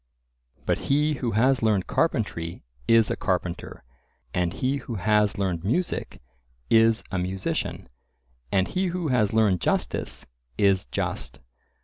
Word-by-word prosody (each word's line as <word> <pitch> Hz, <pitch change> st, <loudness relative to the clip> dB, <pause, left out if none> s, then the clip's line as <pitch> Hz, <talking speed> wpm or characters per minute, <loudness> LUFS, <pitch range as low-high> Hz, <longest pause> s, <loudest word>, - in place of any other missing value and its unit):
But -, -, +1 dB
he 150 Hz, +2 st, +3 dB
who 125 Hz, -5 st, -2 dB
has 130 Hz, +5 st, +3 dB
learned 105 Hz, -5 st, +2 dB
carpentry 95 Hz, -, -1 dB, 0.2 s
is 115 Hz, -2 st, +5 dB
a -, -, 0 dB
carpenter, 90 Hz, -7 st, -3 dB, 0.5 s
and 90 Hz, -1 st, +1 dB
he 130 Hz, +9 st, -1 dB
who 125 Hz, -3 st, -6 dB
has 105 Hz, +1 st, +2 dB
learned 90 Hz, -4 st, -1 dB
music 130 Hz, -, -2 dB, 0.5 s
is 115 Hz, 0 st, +5 dB
a 95 Hz, -, -1 dB
musician, 95 Hz, +1 st, -3 dB, 0.6 s
and 95 Hz, -1 st, +2 dB
he 185 Hz, +1 st, -1 dB
who 175 Hz, -3 st, -2 dB
has 110 Hz, -6 st, +2 dB
learned 105 Hz, -6 st, +3 dB
justice -, -, -1 dB, 0.3 s
is 100 Hz, -2 st, +3 dB
just. -, -, -4 dB
110 Hz, 130 wpm, -25 LUFS, 95-130 Hz, 0.6 s, is